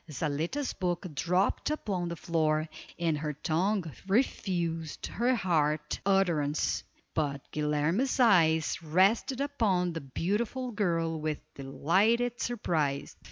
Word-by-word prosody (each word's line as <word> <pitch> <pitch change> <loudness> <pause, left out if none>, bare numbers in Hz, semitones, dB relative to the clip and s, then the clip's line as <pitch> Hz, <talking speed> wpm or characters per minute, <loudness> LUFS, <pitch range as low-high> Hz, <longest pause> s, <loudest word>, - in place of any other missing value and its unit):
Zaletta's 160 - -2
book 180 0 -2
dropped 180 - +1
upon 195 - -2
the 170 - -4
floor, 155 -1 0 0.3
and 165 -3 0
her 150 0 -2
tongue 165 +2 0
refused 175 - -1
her 245 +3 +1
heart 155 -7 0
utterance, 170 -7 +1 0.3
but 145 -3 -1
Guilerme's 150 - 0
eyes 165 - +4
rested 195 - +2
upon 200 -11 +1
the 165 - -4
beautiful 210 - -2
girl 165 -6 0
with 155 -1 -2 0.2
delighted 210 - +1
surprise. 155 -12 -1
170 Hz, 110 wpm, -30 LUFS, 155-205 Hz, 0.3 s, eyes